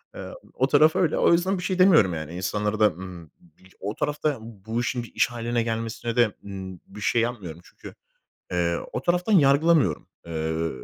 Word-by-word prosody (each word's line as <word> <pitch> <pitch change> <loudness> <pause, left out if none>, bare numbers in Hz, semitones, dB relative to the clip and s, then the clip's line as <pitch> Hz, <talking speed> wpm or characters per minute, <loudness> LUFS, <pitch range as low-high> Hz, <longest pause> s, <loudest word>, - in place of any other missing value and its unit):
Eee, - - -7 0.2
o - - +1
taraf 155 +1 +4
öyle. 165 -4 +2
O - - +4
yüzden 185 +3 +1
bir - - -6
şey 185 0 -2
demiyorum 165 - +5
yani. 80 0 -6
İnsanlara 105 +4 -2
da, 110 - +6
ımm, 90 -1 -7
m 80 - -19 0.4
c - - -26
o 100 +3 -4
tarafta 150 +1 -1
ya, 145 - -3
bu 110 +1 -5
işin 120 0 -2
bir 115 - -13
iş - - +3
hâline 120 0 -1
gelmesine 115 0 -3
de, 120 -3 +3
ııı, 95 -2 -7
bir 105 +2 -11
şey 115 +3 +2
yapmıyorum. 100 -9 -4
Çünkü, - - -13 0.6
eee, 85 -1 0 0.2
o - - -2
taraftan 180 +4 +1
yargılamıyorum. 145 - +4 0.2
Eee, 80 0 -2
115 Hz, 195 wpm, -25 LUFS, 95-145 Hz, 0.6 s, da